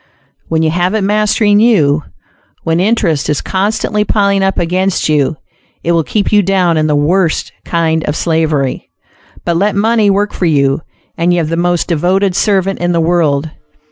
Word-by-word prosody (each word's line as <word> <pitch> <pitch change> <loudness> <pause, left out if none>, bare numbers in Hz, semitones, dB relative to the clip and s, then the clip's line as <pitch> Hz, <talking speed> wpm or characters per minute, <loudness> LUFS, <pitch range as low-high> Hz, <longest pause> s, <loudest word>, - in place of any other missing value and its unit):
When 160 0 0
you 160 - +1
have 180 +4 0
it 215 - 0
mastering 210 0 +2
you; 160 -11 +3 0.6
when 165 +1 0
interest 185 -7 0
is 150 - 0
constantly 210 +2 -1
piling 200 -1 +1
up 195 0 0
against 185 +2 0
you, 150 0 0 0.5
it 170 - 0
will 165 -1 +2
keep 205 +5 -1
you 210 -1 +4
down 185 -3 +1
in 155 0 +1
the 150 - +1
worst 165 +3 0
kind 160 -1 0
of 150 - -2
slavery. 155 -5 -1 0.6
But 170 -1 0
let 200 +3 0
money 215 0 +2
work 205 +1 0
for 180 - -1
you, 140 -2 +1 0.4
and 170 +1 +2
you 175 - +1
have 160 -3 -1
the 165 - -1
most 175 0 0
devoted 180 +3 0
servant 195 -2 0
in 175 0 0
the 170 - +1
world. 160 -3 0
175 Hz, 175 wpm, -13 LUFS, 160-200 Hz, 0.6 s, you